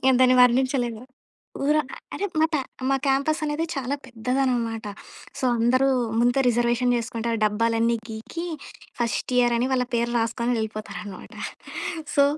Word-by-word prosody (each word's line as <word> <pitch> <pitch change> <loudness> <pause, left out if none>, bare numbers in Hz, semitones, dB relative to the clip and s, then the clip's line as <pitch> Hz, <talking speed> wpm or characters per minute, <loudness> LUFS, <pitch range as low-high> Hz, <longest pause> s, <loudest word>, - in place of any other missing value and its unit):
నేను 265 -1 +5
దాన్ని 255 0 +6
వర్ణించలేను. 250 -2 +2 0.6
ఊర 300 +2 +3 0.4
అంటే 405 - -2
మా 320 - +5
తా 290 - +2 0.3
మా 270 - +4
క్యాంపసనేది 300 +3 +1
చాలా 275 0 -2
పెద్దదన్నమాట. 240 -2 -1 0.5
సో, - - -2
అందరూ 255 +4 +3 0.3
ముందే 245 +3 +3
రిజర్వేషన్ 240 +1 +2
జేసుకుంటారు. 230 0 -2
డబ్బాలన్నీ 230 +2 +2
గీకి 225 +10 -6 0.5
ఫస్ట్ 235 +2 -1
ఇయరని 240 0 +3
వాళ్ళ 255 -1 +2
పేరు 235 0 +1
రాస్కొని 235 +1 0
యెల్లిపోతారనమాట. 215 -3 -6 0.8
సో 280 - +6
240 Hz, 120 wpm, -25 LUFS, 230-265 Hz, 0.8 s, దాన్ని